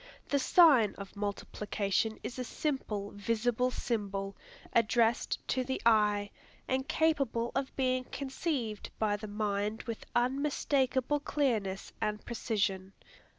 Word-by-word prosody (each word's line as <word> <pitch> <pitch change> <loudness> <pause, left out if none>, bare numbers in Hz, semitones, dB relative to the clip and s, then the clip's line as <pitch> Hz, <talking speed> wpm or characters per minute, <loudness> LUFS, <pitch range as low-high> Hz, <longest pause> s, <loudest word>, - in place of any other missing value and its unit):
The 285 - +2
sign 270 - +6
of 200 0 -9
multiplication 205 +1 -1
is 255 - -5
a - - -1
simple, 230 -8 -3
visible 230 +4 0
symbol, 200 -5 -3 0.4
addressed 230 0 +3
to 260 - +1
the 260 +1 -2
eye, 210 -2 +4 0.4
and 265 +1 0
capable 275 -8 +1
of 275 0 -2
being 255 -1 +1
conceived 265 - -3
by 210 -2 +1
the 215 +1 -6
mind 210 +1 -1
with 230 -2 -6
unmistakable 270 +1 +1
clearness 220 -10 -1
and 210 -1 -2
precision. 195 -5 -1
230 Hz, 115 wpm, -32 LUFS, 205-265 Hz, 0.4 s, sign